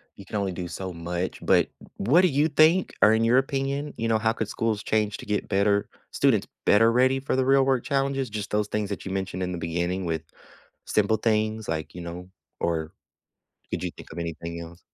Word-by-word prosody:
you 100 - -12
can 105 - -7
only 100 -2 0
do 90 0 -5
so 95 +2 -5
much, 85 +2 -4
but - - +4 0.3
w 105 - -3
what 170 +5 +7
do 185 - +5
you 150 -1 +2
think 160 +4 +4
or 110 - +7
in 110 +1 +2
your 120 +3 +4
opinion, 135 +2 -1
you 115 - -1
know, 110 -1 +3
how 110 0 +2
could 110 - -3
schools 110 -1 -1
change 105 -2 0
to - - -10
get 105 0 -2
better 100 0 +2 0.2
students - - +2 0.2
better 115 +3 +5
ready 130 +2 +3
for 135 - -1
the 130 0 +2
real 135 0 +5
work 130 -3 +2
challenges? 135 -3 0
Just 105 -1 -5
those 105 0 +1
things 105 -2 -2
that 100 - -5
you 95 - -4
mentioned 95 -1 -3
in 90 - -2
the 90 - -3
beginning 85 +2 -2
with 80 -2 -1 0.7
simple 105 +1 +2
things, 110 -1 0
like 80 -1 -3
you 90 - -7
know 90 +2 -7 0.3
or 80 -1 -1 0.8
could - - -3
you - - -2
think - - -12
of 80 - -7
anything 85 0 -5
else? 85 +1 -10
105 Hz, 220 wpm, -26 LUFS, 90-125 Hz, 0.8 s, what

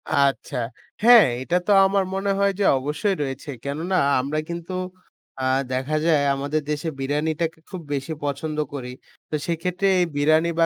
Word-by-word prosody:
আচ্ছা, 140 0 +1 0.5
হ্যাঁ, 235 -2 +9
এইটা 170 +7 -1
তো - - +3
আমার 195 0 +2
মনে 195 +1 0
হয় 200 0 +3
যে - - +2
অবশ্যই 150 +9 -1
রয়েছে। 135 +1 -6
কেননা 160 +7 -2 0.2
আমরা 140 +4 -1
কিন্তু 170 +2 -5 0.7
আ - - -2 0.3
দেখা 135 +4 -1
যায়, 155 -4 +4
আমাদের 145 +3 -1
দেশে 150 +2 -2
বিরিয়ানিটাকে 155 +4 -1
খুব 185 -3 -6
বেশি 140 +3 -3
পছন্দ 145 +2 -3 0.2
করি। 125 -3 -5 0.4
তো - - -2
সেইক্ষেত্রে 180 +3 -1
এই 175 - +3
বিরিয়ানি 155 +3 +3
বা 165 - +6
155 Hz, 160 wpm, -23 LUFS, 140-175 Hz, 0.7 s, হ্যাঁ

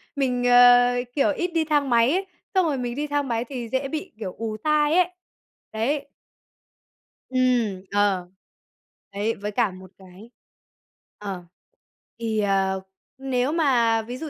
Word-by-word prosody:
mình, 255 -3 0
ờ, 245 0 +7 0.2
kiểu, 285 +2 +2
ít 350 - -1
đi 325 -1 +1
thang 290 -3 +1
máy 235 +1 +4
ấy, 380 +2 0 0.3
xong 375 -2 +3
rồi 295 -4 0
mình 245 -1 -3
đi 295 +2 -3
thang 290 -1 -1
máy 235 -1 -1
thì 245 -4 -6
dễ 265 +3 -1
bị, 315 +6 -5
kiểu, 190 -5 -5
ù 220 -1 -4
tai 300 +5 +2
ấy. 360 -1 +3 0.6
Đấy. 265 +7 -2 1.2
Ừm, 245 -7 +1
ờ. 200 -3 +1 0.8
Đấy, 210 +3 -1
với 205 +1 -5
cả 215 -1 +1
một 185 0 -13
cái 190 +4 -15 0.9
ờ, 195 -3 -6 0.8
thì, 225 -2 -1
ờ, 195 -2 +1 0.4
nếu 265 0 -1
mà 240 -8 +2
ví 245 +3 -7
dụ 310 +3 -6
245 Hz, 150 wpm, -24 LUFS, 210-285 Hz, 1.2 s, ờ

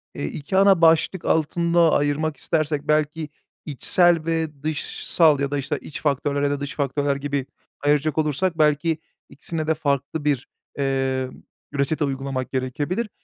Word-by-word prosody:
eee, - - -3
2 145 - -3
ana 195 -3 +5
başlık 165 +2 +3
altında 170 +1 +2
ayırmak 145 +2 0
istersek 155 -3 -1
belki 155 +1 0 0.4
içsel 165 +3 +3
ve 160 -3 -2
dışsal 155 0 +2
ya 140 0 -1
da, 145 - 0
işte, 135 - -2
iç 145 - -8
faktörler 145 -1 0
ya 145 - +2
da 145 - -2
dış 145 +1 -5
faktörler 140 0 0
gibi 140 -1 -2 0.4
ayıracak 150 +1 +2
olursak 160 +3 0
belki 155 +1 +2 0.3
2'sine 160 -2 -5
de 160 - +3
farklı 145 0 -2
bir, 140 -4 0 0.3
eee, 135 -1 0 0.4
ü 140 - -5
reçete 150 +3 +1
uygulamak 135 -1 -3
gerekebilir. 145 - -2
150 Hz, 150 wpm, -23 LUFS, 140-160 Hz, 0.4 s, ana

